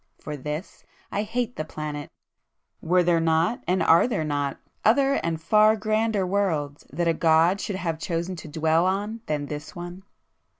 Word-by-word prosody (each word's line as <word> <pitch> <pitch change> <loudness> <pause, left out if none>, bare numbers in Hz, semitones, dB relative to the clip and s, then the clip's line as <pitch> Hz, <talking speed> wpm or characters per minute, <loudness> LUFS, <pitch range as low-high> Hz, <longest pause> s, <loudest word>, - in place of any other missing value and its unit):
For 150 - -6
this 150 +6 -6 0.3
I 205 - 0
hate 235 +3 -3
the 155 - -1
planet;—were 155 +3 -4
there 170 -1 +3
not, 165 +9 +1
and 185 +1 +2
are 165 +1 +6
[p - - +2
252] - - -6
there 160 - 0
not, 145 -2 -2 0.3
other 270 +5 +4
and 165 -1 -1
far 215 +6 +4
grander 215 -2 0
worlds 165 -7 -1
that 170 +4 -1
a 165 - +4
God 165 +4 +3
should 205 - -3
have 170 -4 -3
chosen 170 +2 -2
to 160 - -9
dwell 160 +3 +2
on 205 +4 -2
than 150 -1 -1
this 150 +6 -7
one!" 175 +1 -7
170 Hz, 175 wpm, -25 LUFS, 155-205 Hz, 0.3 s, are